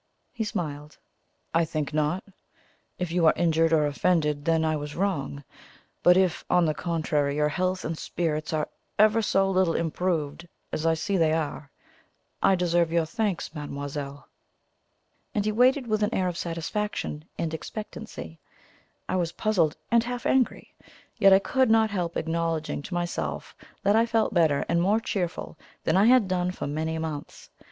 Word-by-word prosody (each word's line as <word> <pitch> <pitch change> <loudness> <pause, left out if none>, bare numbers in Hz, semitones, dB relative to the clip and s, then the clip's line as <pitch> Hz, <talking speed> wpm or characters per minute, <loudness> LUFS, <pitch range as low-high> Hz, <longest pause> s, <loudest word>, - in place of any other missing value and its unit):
He 230 - -2
smiled. 150 -8 -5 0.6
"I 165 0 +4
think 155 -2 -3
not. 155 +4 0 0.7
If 180 -2 -3
you 170 -1 +3
are - - +5
injured 165 -1 +2
or 155 -2 +4
offended, 150 -1 +1
then 160 -1 +2
I 155 0 +1
was 150 0 -5
wrong; 155 -7 -2 0.6
but 180 +1 +6
if, 180 -3 +2
on 180 -1 +4
the 155 - +1
contrary, 155 -4 -1
your 150 0 +2
health 185 +3 -1
and 160 - -2
spirits 155 -1 -2
are 155 -2 0 0.3
ever 215 +2 +5
so 195 -2 +2
little 185 -3 +2
improved, 170 -1 -1 0.2
as 160 - -1
I 165 - +3
see 195 +4 -1
they 160 -2 +3
are, 155 -2 -3 0.7
I 195 - +5
deserve 175 -2 +1
your 170 -1 +2
thanks, 195 0 -2
mademoiselle." 145 -2 -6 1.1
And 205 - +1
he 215 - +1
waited 255 +4 +3
with 215 -2 0
an 210 +2 +1
air 185 - +1
of 175 - -2
satisfaction 170 -2 -3
and 160 -1 -2
expectancy. 210 - -7 0.7
I - - -1
was 170 -2 -1
puzzled 180 -8 +1
and 235 -1 +5
half 245 0 -5
angry, 260 -2 +1 0.5
yet 195 - +7
I 190 - +9
could 260 +5 +1
not 220 -1 +4
help 175 -4 -2
acknowledging 165 -2 -1
to 175 - -6
myself 175 0 -3 0.3
that 200 0 +4
I 230 +1 +4
felt 225 -1 +1
better 160 -5 +3
and 170 +1 +2
more 205 +5 +3
cheerful 180 -7 -4 0.2
than - - +1
I 195 +2 +5
had 245 -3 +5
done 180 -1 0
for 180 - -5
many 160 +3 -2
months. 155 -3 -6
170 Hz, 165 wpm, -26 LUFS, 155-195 Hz, 1.1 s, I